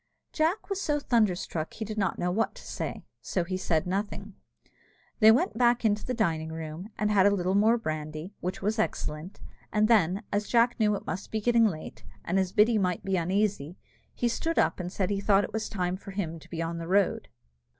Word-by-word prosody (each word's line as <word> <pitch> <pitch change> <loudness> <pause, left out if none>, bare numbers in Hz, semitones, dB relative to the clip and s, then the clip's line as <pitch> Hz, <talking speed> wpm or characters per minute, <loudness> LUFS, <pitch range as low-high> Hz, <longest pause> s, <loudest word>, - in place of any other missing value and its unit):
Jack 330 +6 0
was 395 -1 -2
so 295 -4 0
thunderstruck 190 - 0
he 220 - -4
did 215 0 -5
not 195 - 0
know 180 - 0
what 225 +5 0
to - - -12
say, - - -5 0.2
so 180 - -1
he 185 +2 -4
said 165 -4 0
nothing. 200 +2 -3 0.9
They 220 -1 +8
went 225 -1 +1
back 240 -1 +3
into 210 -1 +2
the 250 - -3
dining 160 -8 0
room, 160 +4 -6
and 210 0 0
had 200 -1 +5
a - - +6
little 185 -2 0
more 220 +4 +4
brandy, 155 -2 -5
which 185 +3 -4
was 215 +3 0
excellent, 165 -3 -3 0.3
and 215 0 +3
then, 200 -2 +3
as 205 +1 0
Jack 235 0 +3
knew 215 -1 +4
that 200 - -2
it - - -21
must 190 - -5
be 220 - -1
getting 230 +1 +4
late, 160 -6 -6 0.2
and 185 +3 +1
as 185 -1 0
Biddy 215 +2 +4
might 180 -3 -1
be 195 -1 0
uneasy, 185 -2 0 0.4
he 240 - 0
stood 325 +8 -2
up, - - +2
and 180 0 -4
said 195 0 -1
he 200 -1 -1
thought 200 0 +4
it - - -6
was 220 0 -2
time 180 -3 -2
for 200 - -12
him 175 -5 -4
to - - -17
be 165 -1 -3
on 165 0 -4
the 165 - -6
road. 195 +1 +2
200 Hz, 220 wpm, -28 LUFS, 180-220 Hz, 0.9 s, They